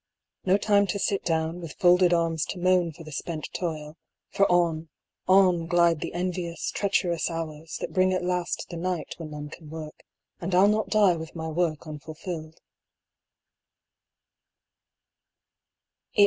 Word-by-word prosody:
No 190 +1 +4
time 205 -1 +3
to 200 - -1
sit 200 0 0
down 160 +1 -1
with 165 -3 -7
folded 180 0 +5
arms 165 -2 +1
to - - -5
moan 180 -1 +3
for 165 +2 -12
the 155 - -10
spent 155 +1 -4
toil, 155 -3 -4 0.3
for 200 - +3
on, 165 -2 +2 0.4
on, 185 -3 +5
glide 170 -1 +3
the - - -5
envious 175 -1 -2
treacherous 180 -4 0
hours 160 -1 -5
that - - -5
bring 185 0 +3
at 185 -1 0
last 180 -1 -1
the 170 - -5
night 180 -1 -2
when 165 -2 -7
none 150 -1 -7
can 155 0 -12
work; 155 -1 -8 0.4
and 180 +1 -2
I'll 190 +2 +6
not 215 +1 +1
die 205 -5 +4
with 160 +1 -8
my 160 -1 -4
work 160 -1 -1
unfulfilled. 155 +1 -7
170 Hz, 150 wpm, -26 LUFS, 160-185 Hz, 0.4 s, I'll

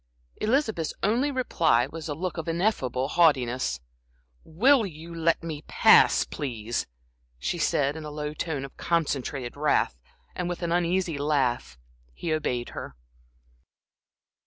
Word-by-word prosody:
Elizabeth's 220 - 0
only 235 +8 +2
reply 170 - +2
was 160 +3 -7
a 145 - -2
look 180 +2 -4
of 160 - -5
ineffable 165 - 0
haughtiness. 130 - +2 0.6
"Will 240 - +4
you 170 -3 -8
let 165 0 +1
me 155 -2 -5
pass, - - +6
please?" 120 -5 -4 0.5
she 170 - -3
said, 145 -2 +1
in 160 - -7
a 150 - -6
low 150 0 -4
tone 150 -3 -3
of 135 - -13
concentrated 140 -6 -1
wrath, 145 - +1 0.3
and 180 -1 -3
with 175 0 -4
an 170 - -1
uneasy 175 -2 0
laugh, 130 - 0 0.4
he 165 - -2
obeyed 125 -6 -2
her. - - -8
155 Hz, 135 wpm, -26 LUFS, 135-175 Hz, 0.6 s, pass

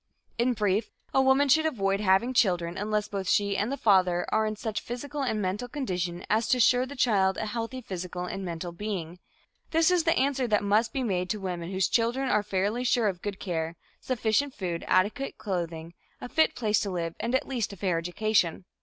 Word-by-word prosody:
In 245 +1 +3
brief, 210 -1 0 0.2
a 270 - +5
woman 265 +2 +4
should 315 +4 +4
avoid 195 -9 0
having 205 +5 +3
children 175 -7 +2
unless 210 +1 -1
both 195 -2 -4
she 200 -1 +2
and 210 +6 0
the 280 - -2
father 185 -6 +3
are 220 0 +2
in 215 - -2
such 215 0 -3
physical 285 +5 -5
and 240 -5 0
mental 205 +5 -2
condition 180 - -3
as 220 +2 +1
to 255 - +3
assure 250 +1 +4
the 285 - -8
child 195 -7 +2
a - - -2
healthy 230 +4 -4
physical 180 -4 -5
and 195 +2 -5
mental 175 0 -5
being. 180 -2 -5 0.5
This 325 +2 +3
is 355 -2 +3
the 330 0 +2
answer 265 -1 +1
that 210 -2 +2
must 210 +3 +2
be 265 - -2
made 180 -5 -1
to 210 - -1
women 180 -3 -4
whose 190 0 +1
children 245 +3 +1
are 210 - +3
fairly 205 +4 -1
sure 240 -2 +2
of 180 -2 -6
good 205 -2 -4
care, 165 -3 -3 0.2
sufficient 255 +3 0
food, 175 -4 -3
adequate 205 +9 +1
clothing, 170 -5 -4 0.3
a - - -6
fit 315 +5 +2
place 215 -3 +1
to 200 - -2
live 170 -3 -3
and 235 +3 -1
at 260 - 0
least 245 -6 -2
a 200 - -10
fair 180 -3 0
education. 180 0 0
210 Hz, 205 wpm, -28 LUFS, 185-245 Hz, 0.5 s, a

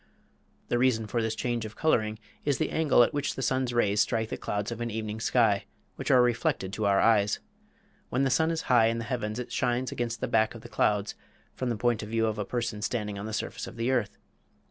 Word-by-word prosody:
The 120 - +1
reason 120 -3 +2
for 115 +2 -1
this 110 0 -1
change 120 0 -2
of 110 0 -7
coloring 110 -9 +1 0.3
is 145 -3 +1
the - - -1
angle 150 -6 +4
at - - 0
which 145 0 -1
the 135 - -3
sun's 130 0 +1
rays 105 -3 +2
strike 110 -2 0
the - - -3
clouds 105 +2 -3
of 115 0 -5
an 120 - -2
evening 110 -1 -4
sky, 110 -4 +2 0.3
which - - -5
are 125 -1 +6
reflected 115 -5 0
to 110 -1 0
our 100 -1 +4
eyes. 105 -2 +3 0.7
When 130 +2 +1
the 135 - +2
sun 160 +6 +3
is 165 -1 -2
high 120 -3 +4
in 115 0 0
the 115 - -3
heavens 115 -3 -3
it 125 - -5
shines 125 +1 0
against 120 -1 -3
the - - -2
back 110 +1 +2
of 115 - -9
the - - -11
clouds, 105 0 +1 0.4
from 130 - -3
the 115 - -1
point 120 0 +1
of 105 - -7
view 115 0 +1
of 110 -1 -2
a 105 - -1
person 115 -2 -3
standing 105 -2 -2
on 100 - -5
the - - -5
surface 110 - -4
of - - -9
the 120 +2 0
earth. 120 -6 0
115 Hz, 240 wpm, -28 LUFS, 110-125 Hz, 0.7 s, are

